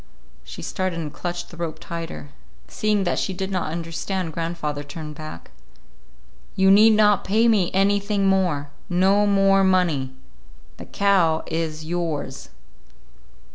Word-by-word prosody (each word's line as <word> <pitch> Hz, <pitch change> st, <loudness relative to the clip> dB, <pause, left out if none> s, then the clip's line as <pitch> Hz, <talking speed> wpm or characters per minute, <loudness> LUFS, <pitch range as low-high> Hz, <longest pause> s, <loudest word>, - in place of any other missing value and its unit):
She 65 Hz, +5 st, -9 dB
started 185 Hz, -, -2 dB
and 155 Hz, -3 st, -5 dB
clutched 175 Hz, 0 st, -5 dB
the 170 Hz, -, -12 dB
rope 165 Hz, -2 st, -4 dB
tighter. 165 Hz, -, -7 dB, 0.4 s
Seeing 210 Hz, -, 0 dB
that 175 Hz, -, 0 dB
she 190 Hz, -, -2 dB
did 190 Hz, +1 st, -4 dB
not 180 Hz, -4 st, -2 dB
understand, 165 Hz, +1 st, -4 dB
grandfather 165 Hz, -3 st, -3 dB
turned 150 Hz, +1 st, -8 dB
back. 150 Hz, -, -10 dB, 1.0 s
"You 190 Hz, 0 st, +4 dB
need 215 Hz, +3 st, +7 dB
not 210 Hz, -2 st, +4 dB
pay 220 Hz, +4 st, +2 dB
me 205 Hz, -6 st, +3 dB
anything 200 Hz, +1 st, +1 dB
more; 175 Hz, -7 st, +1 dB, 0.2 s
no 195 Hz, +3 st, +3 dB
more 195 Hz, -1 st, +4 dB
money. 165 Hz, -9 st, +1 dB, 0.6 s
The -, -, -9 dB
cow 180 Hz, -6 st, +2 dB
is 160 Hz, -1 st, -3 dB
yours." 160 Hz, -5 st, -4 dB
175 Hz, 135 wpm, -23 LUFS, 160-195 Hz, 1.0 s, need